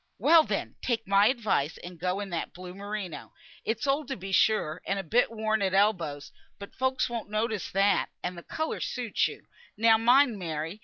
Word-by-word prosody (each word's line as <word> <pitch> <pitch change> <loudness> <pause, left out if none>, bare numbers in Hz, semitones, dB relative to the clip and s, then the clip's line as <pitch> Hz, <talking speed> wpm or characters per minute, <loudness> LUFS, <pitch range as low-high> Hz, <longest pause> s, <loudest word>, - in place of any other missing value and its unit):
"Well, 330 -1 +6
then! - - -3
take 230 -3 -1
my 200 +1 +5
advice, 210 - 0
and 175 -1 -10
go 180 +3 -1
in 200 -2 -6
that 170 - -3
blue 180 0 -9
merino. 200 -3 -6 0.3
It's 225 +3 -2
old 280 +1 0
to 265 - -4
be 195 +1 -7
sure, 190 -6 +2
and 195 - 0
a 195 - -3
bit 230 +9 +2
worn 220 -1 -1
at 190 -1 +1
elbows, 170 -9 +1 0.3
but 200 - -10
folk 260 0 0
won't 230 -3 -5
notice 215 -1 -2
that, 200 +1 +2
and 180 0 -3
th' 170 - -11
colour 315 0 -3
suits 245 -4 -1
you. - - -10 0.3
Now 225 0 +5
mind, 245 -1 +4
Mary. 165 +2 -4
205 Hz, 195 wpm, -28 LUFS, 180-230 Hz, 0.3 s, Well